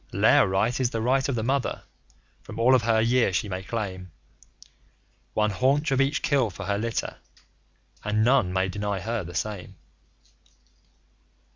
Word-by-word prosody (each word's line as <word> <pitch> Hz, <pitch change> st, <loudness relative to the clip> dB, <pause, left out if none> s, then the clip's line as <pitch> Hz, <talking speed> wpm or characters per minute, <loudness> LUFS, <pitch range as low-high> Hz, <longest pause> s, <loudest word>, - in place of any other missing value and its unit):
Lair -, -, +4 dB
Right 100 Hz, +7 st, 0 dB
is 130 Hz, -2 st, +1 dB
the 115 Hz, -, -3 dB
right 130 Hz, +4 st, +1 dB
of 135 Hz, -, 0 dB
the 110 Hz, -, -2 dB
Mother. 135 Hz, +2 st, -1 dB, 0.6 s
From -, -, -10 dB
all 120 Hz, +3 st, +4 dB
of 130 Hz, -, +5 dB
her 115 Hz, -1 st, +2 dB
year 115 Hz, -1 st, +2 dB
she 95 Hz, +4 st, -1 dB
may 95 Hz, -1 st, -4 dB
claim 95 Hz, -4 st, -5 dB, 1.3 s
One 105 Hz, 0 st, +2 dB
haunch 135 Hz, +8 st, +1 dB
of 135 Hz, 0 st, +3 dB
each 135 Hz, +3 st, 0 dB
kill 135 Hz, -6 st, +2 dB
for 90 Hz, -, -8 dB
her 100 Hz, 0 st, -1 dB
litter, 115 Hz, +1 st, -3 dB, 0.9 s
and 105 Hz, +1 st, +1 dB
none 120 Hz, -6 st, +3 dB
may 95 Hz, +1 st, 0 dB
deny 100 Hz, +1 st, -3 dB
her 110 Hz, +2 st, -3 dB
the 85 Hz, 0 st, -9 dB
same. 100 Hz, +2 st, -4 dB
110 Hz, 160 wpm, -25 LUFS, 100-125 Hz, 1.3 s, of